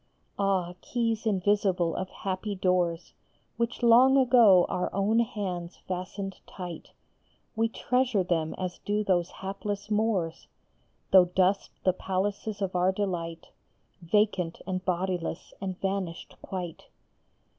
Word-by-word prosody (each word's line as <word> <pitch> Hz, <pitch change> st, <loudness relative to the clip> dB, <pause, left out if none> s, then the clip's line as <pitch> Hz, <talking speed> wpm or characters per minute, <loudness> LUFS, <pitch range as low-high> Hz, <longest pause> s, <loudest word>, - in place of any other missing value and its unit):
Ah, 190 Hz, -3 st, +1 dB
keys 230 Hz, -2 st, -1 dB
invisible 195 Hz, -4 st, +1 dB
of 185 Hz, -, -3 dB
happy 195 Hz, +2 st, -4 dB
doors 180 Hz, -2 st, 0 dB, 0.4 s
Which 235 Hz, +1 st, -2 dB
long 250 Hz, +3 st, +7 dB
ago 235 Hz, -8 st, +6 dB
our 180 Hz, -, -2 dB
own 205 Hz, +4 st, +2 dB
hands 185 Hz, -6 st, -3 dB
fastened 185 Hz, +1 st, -4 dB
tight! 175 Hz, -3 st, -8 dB, 0.7 s
We 225 Hz, +1 st, +2 dB
treasure 250 Hz, -4 st, +1 dB
them 165 Hz, -3 st, -1 dB
as 185 Hz, -1 st, -4 dB
do 210 Hz, +1 st, -1 dB
those 180 Hz, -3 st, +1 dB
hapless 200 Hz, +2 st, -5 dB
Moors, 210 Hz, -6 st, 0 dB, 0.6 s
Though 185 Hz, -2 st, +8 dB
dust 185 Hz, +2 st, +1 dB
the 185 Hz, -, +3 dB
palaces 200 Hz, +2 st, -2 dB
of 190 Hz, -1 st, -3 dB
our 180 Hz, +1 st, +3 dB
delight, 175 Hz, -4 st, -3 dB, 0.5 s
Vacant 180 Hz, -2 st, +1 dB
and 185 Hz, 0 st, -3 dB
bodiless 180 Hz, -2 st, -2 dB
and 190 Hz, -2 st, -4 dB
vanished 190 Hz, -3 st, -3 dB
quite. 180 Hz, -4 st, -6 dB
190 Hz, 120 wpm, -28 LUFS, 180-210 Hz, 0.7 s, Though